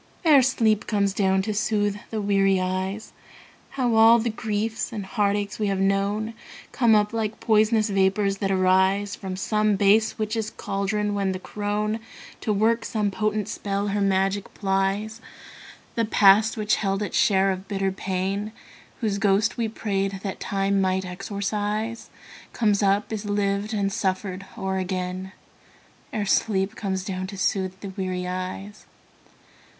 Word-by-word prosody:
Ere 295 -4 +7
sleep 225 -4 +2
comes 200 -2 +1
down 190 -1 +2
to 215 +1 -2
soothe 205 -1 0
the 220 - -3
weary 195 -2 +2
eyes, 190 +3 -3 0.6
How 245 -3 +1
all 225 +1 +7
the 235 0 -1
griefs 220 0 -2
and 210 -4 -5
heartaches 205 0 -1
we 210 - 0
have 195 -1 0
known 200 +3 0 0.4
Come 235 -4 +4
up 210 +1 +2
like 220 -1 -2
pois'nous 215 0 +3
vapors 195 +1 +2
that 195 - -1
arise 190 +1 +2
From 190 -2 -6
some 210 +2 +1
base 205 +3 +3
witch's 215 0 -2
caldron, 205 +1 -2
when 195 -2 0
the 185 - -5
crone, 210 +2 -2 0.4
To 215 - -2
work 225 +3 +2
some 210 -2 -1
potent 210 0 -1
spell, 200 0 -2
her 205 +1 -1
magic 195 0 +1
plies. 195 +3 -1 0.7
The 230 - 0
past 215 +2 +5
which 215 0 +1
held 195 0 -1
its 205 - -4
share 195 -1 +3
of 190 +1 -5
bitter 195 -1 -1
pain, 195 +3 -3 0.5
Whose 205 -3 0
ghost 205 +1 +2
we 235 -2 -1
prayed 195 -3 -2
that 195 -2 -4
Time 195 0 0
might 190 0 0
exorcise, 205 +4 -3 0.4
Comes 210 -3 +2
up, 200 +2 +1
is 215 -1 -4
lived 205 +1 -1
and 200 -2 -1
suffered 190 0 -2
o'er 190 -2 -2
again, 185 0 -3 0.8
Ere 210 -2 -2
sleep 195 0 +1
comes 190 -3 -3
down 185 -1 -3
to 195 +1 -8
soothe 190 -1 -1
the 200 - -6
weary 185 -1 -3
eyes. 185 +3 -6
200 Hz, 150 wpm, -24 LUFS, 195-215 Hz, 0.8 s, Ere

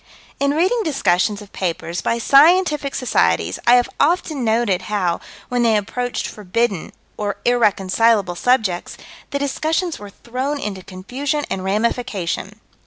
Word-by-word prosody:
In 280 +1 +1
reading 375 +9 +2
discussions 210 - +1
of 200 - -18
papers, 175 -1 -3
by 230 - 0
scientific 300 +3 +4
societies, 85 - +1
I 240 - +8
have 245 0 +3
often 310 -3 +1
noted 220 -4 +1
how, 185 -5 0 0.3
when 245 -1 0
they 225 -2 +4
approached 245 +4 -3
forbidden 210 -1 -2 0.3
or 205 -1 -2
irreconcilable 215 -3 +2
subjects, 210 -3 0 0.3
the 280 - -2
discussions 315 +5 -1
were 205 0 -9
thrown 260 +7 -4
into 200 -6 -4
confusion 260 +11 -3
and 185 - -2
ramification. 210 -2 -2
230 Hz, 130 wpm, -20 LUFS, 195-275 Hz, 0.3 s, I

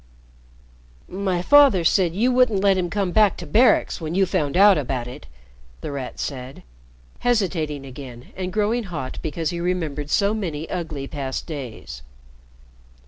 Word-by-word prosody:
"My 185 -2 -2
father 280 -8 +6
said 175 0 +2
you 240 +6 +2
wouldn't 245 -6 +3
let 195 -1 +4
him 180 -2 -1
come 195 0 -1
back 210 0 +3
to 175 - -7
Barracks 220 - +3
when 160 +1 -4
you 195 0 +4
found 170 -5 -1
out 200 0 +7
about 130 -5 -2
it," 125 - -10 0.5
The - - -5
Rat 135 -3 -6
said, 130 -1 -6 0.6
hesitating 170 - -1
again 130 -2 -10
and 185 -1 -4
growing 215 +4 0
hot 155 -8 -6
because 160 +2 -3
he 170 - -4
remembered 160 -5 -2
so 200 +6 +2
many 165 -8 -4
ugly 155 -6 -4
past 135 -2 -4
days. 130 - -7
175 Hz, 150 wpm, -22 LUFS, 145-200 Hz, 0.6 s, out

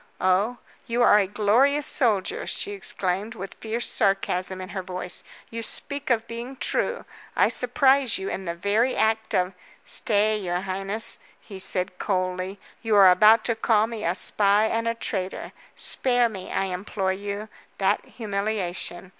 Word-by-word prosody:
"Oh? 190 +6 +2 0.3
you 240 +1 +1
are 210 - +7
a 195 - +1
glorious 235 +9 +3
soldier," 245 - 0
she 405 - -1
exclaimed, 205 - -3
with 195 -1 -7
fierce 225 +2 -3
sarcasm 190 -1 0
in 185 0 -7
her 195 -2 -4
voice. 180 -1 -6 0.3
"You 230 0 -4
speak 285 +5 -4
of 230 -2 +1
being 235 +3 -6
true! - - -1 0.3
I - - +4
surprise 270 -3 +3
you 190 - -5
in 190 - -4
the 170 -1 -3
very 205 +8 +1
act 220 0 +1
of 180 +1 +1 0.2
" - - -34
"Stay, 215 0 +1
your 180 -2 -2
highness!" 195 +3 -1 0.2
he 195 -2 -10
said 185 0 -2
coldly. 185 0 -2 0.2
"You 225 -2 +1
are 195 -2 +8
about 215 +4 +6
to 230 - +1
call 220 -1 +3
me 225 -2 -6
a 170 +2 0
spy 205 +2 +3
and 230 +1 -1
a 230 - 0
traitor. 190 -4 -4 0.2
Spare 245 -2 +1
me, 190 -4 -8
I - - 0
implore 190 +1 -2
you, 200 +2 -5 0.3
that 195 +1 +1
humiliation. 200 -4 -4
205 Hz, 165 wpm, -25 LUFS, 190-230 Hz, 0.3 s, are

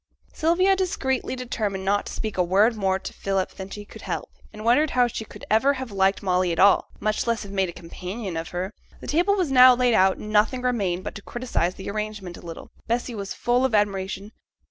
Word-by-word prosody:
Sylvia 365 +4 +3
secretly 265 -8 -2
determined 215 -6 -3
not 200 +1 +1
to - - -6
speak 220 -2 -4
a 185 - +2
word 200 +6 +3
more 190 -3 +1
to - - -8
Philip 195 -1 -1
than 190 0 -8
she 205 +1 -8
could - - -12
help, - - -4 0.2
and 215 0 -9
wondered 290 +7 +4
how 250 - +6
she 230 -2 -4
could - - -12
ever 245 +7 +3
have 260 -3 -6
liked 195 0 +1
Molly 180 -2 +1
at 165 - -2
all, 200 +3 +5
much 215 +2 -1
less 230 -1 0
have 200 - -9
made 190 -2 0
a - - -4
companion 180 +3 -7
of 165 0 -4
her. 185 +4 -4 0.3
The - - -10
table 355 +6 +2
was 360 -8 0
now 255 -1 +8
laid 245 -1 +2
out, 190 -2 +4
and 210 - -7
nothing 220 +4 +2
remained 195 -8 0
but - - -5
to 200 - -9
criticize 235 -7 -2
the 190 - -6
arrangement 210 -4 -5
a - - -12
little. 165 -1 -9 0.2
Bessy 240 +1 -1
was 200 -3 -5
full 245 +1 +1
of 260 -4 +2
admiration. 200 0 -1
210 Hz, 225 wpm, -24 LUFS, 190-245 Hz, 0.3 s, now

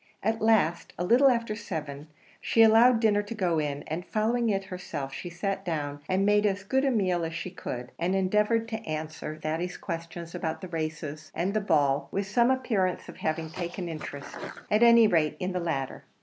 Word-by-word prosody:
At 220 +2 0
last, 210 -7 +2
a 175 - -1
little 250 +9 +5
after 230 -3 0
seven, 150 -8 -6 0.3
she 225 - +4
allowed 225 +2 +6
dinner 210 -2 +3
to 205 +3 -7
go 175 -6 +1
in, 145 -1 -2
and 160 +3 -4
following 225 +4 0
it 195 -2 0
herself, 180 -7 -6
she 175 - -6
sat 195 +3 -3
down 145 -5 -3
and 190 +1 +2
made 210 0 +4
as 195 -1 -1
good 265 +7 +1
a - - +3
meal 185 -8 +1
as 165 0 -3
she 185 - -4
could, 125 -8 -6
and 180 +3 +1
endeavoured 210 +4 +2
to 220 0 -4
answer 155 0 -4
Thady's 160 +3 -3
questions 165 -1 -6
about 160 -2 -3
the 185 - -6
races 155 -2 -5
and 185 +4 -1
the 215 - +1
ball 145 -7 +2
with 200 0 -2
some 235 +5 +3
appearance 225 -9 0
of - - -10
having 160 0 -2
taken 175 0 -5
interest, 150 -3 -7 0.4
at 210 +2 +3
any 235 -1 +8
rate 160 -7 +2
in 185 0 -2
the 180 - -1
latter. 150 -6 -3
185 Hz, 195 wpm, -28 LUFS, 160-215 Hz, 0.4 s, any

